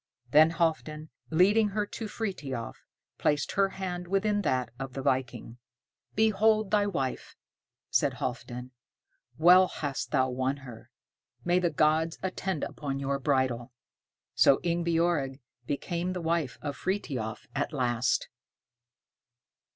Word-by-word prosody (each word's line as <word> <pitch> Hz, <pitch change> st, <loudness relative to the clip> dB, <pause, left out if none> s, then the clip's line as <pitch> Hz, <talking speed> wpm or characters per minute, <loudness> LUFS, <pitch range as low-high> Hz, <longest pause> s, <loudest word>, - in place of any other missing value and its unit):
Then 155 Hz, +3 st, +7 dB
Halfdan, 155 Hz, -2 st, -1 dB, 0.2 s
leading 205 Hz, +6 st, +4 dB
her 205 Hz, +1 st, -1 dB
to 220 Hz, +2 st, -6 dB
Frithiof, 145 Hz, -, -4 dB, 0.5 s
placed 145 Hz, -1 st, +1 dB
her 195 Hz, 0 st, +2 dB
hand 180 Hz, -2 st, -5 dB
within 205 Hz, +2 st, +1 dB
that 130 Hz, -, 0 dB
of 135 Hz, -1 st, -5 dB
the 135 Hz, -, -5 dB
viking. 125 Hz, -3 st, -2 dB, 0.6 s
"Behold 215 Hz, -1 st, +3 dB
thy 205 Hz, -1 st, +3 dB
wife," 135 Hz, -10 st, -3 dB, 0.6 s
said -, -, +2 dB
Halfdan. 125 Hz, 0 st, -5 dB, 0.7 s
"Well 180 Hz, +4 st, +7 dB
hast 145 Hz, -5 st, -4 dB
thou 130 Hz, 0 st, +2 dB
won 130 Hz, +2 st, -1 dB
her. 115 Hz, -3 st, -11 dB, 0.6 s
May 175 Hz, +1 st, +3 dB
the 175 Hz, -1 st, +1 dB
gods 155 Hz, +1 st, +2 dB
attend 190 Hz, -3 st, -2 dB
upon 140 Hz, -2 st, -4 dB
your 140 Hz, 0 st, -1 dB
bridal." 130 Hz, -3 st, 0 dB, 0.6 s
So 135 Hz, -, +5 dB
Ingebjorg 170 Hz, -5 st, +1 dB, 0.3 s
became 170 Hz, +5 st, -2 dB
the 180 Hz, -, -4 dB
wife 165 Hz, -5 st, -1 dB
of 145 Hz, -2 st, -3 dB
Frithiof 135 Hz, -, -3 dB
at 145 Hz, +2 st, -1 dB
last. 125 Hz, -3 st, 0 dB
155 Hz, 120 wpm, -29 LUFS, 130-185 Hz, 0.7 s, Then